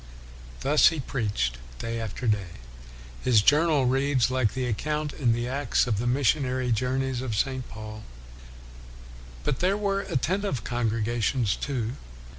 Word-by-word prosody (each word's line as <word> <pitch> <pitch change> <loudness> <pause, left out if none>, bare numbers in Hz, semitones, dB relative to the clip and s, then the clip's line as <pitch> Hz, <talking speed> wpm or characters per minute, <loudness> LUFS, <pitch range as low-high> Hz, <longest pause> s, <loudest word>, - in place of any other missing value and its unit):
Thus 145 +2 +5
he 165 -2 +1
preached 105 - -2 0.2
day 115 - -3
after 110 +2 -5
day. 100 -6 -1 0.7
His 115 -5 +4
journal 150 0 +4
reads 135 -1 +2
like 130 -4 +1
the 130 -1 -1
account 150 +6 -2
in 125 -5 +1
the 120 +1 0
Acts 135 0 +1
of 110 -5 -1
the 120 - -1
missionary 130 0 +1
journeys 130 +2 0
of 125 -5 -3
St. 130 +3 -1
Paul. 110 0 -8 1.4
But 125 - -1
there 190 +3 +2
were 200 -1 0
attentive 175 - -1
congregations, 115 -1 0
too. 125 -3 -3
125 Hz, 135 wpm, -26 LUFS, 115-140 Hz, 1.4 s, Thus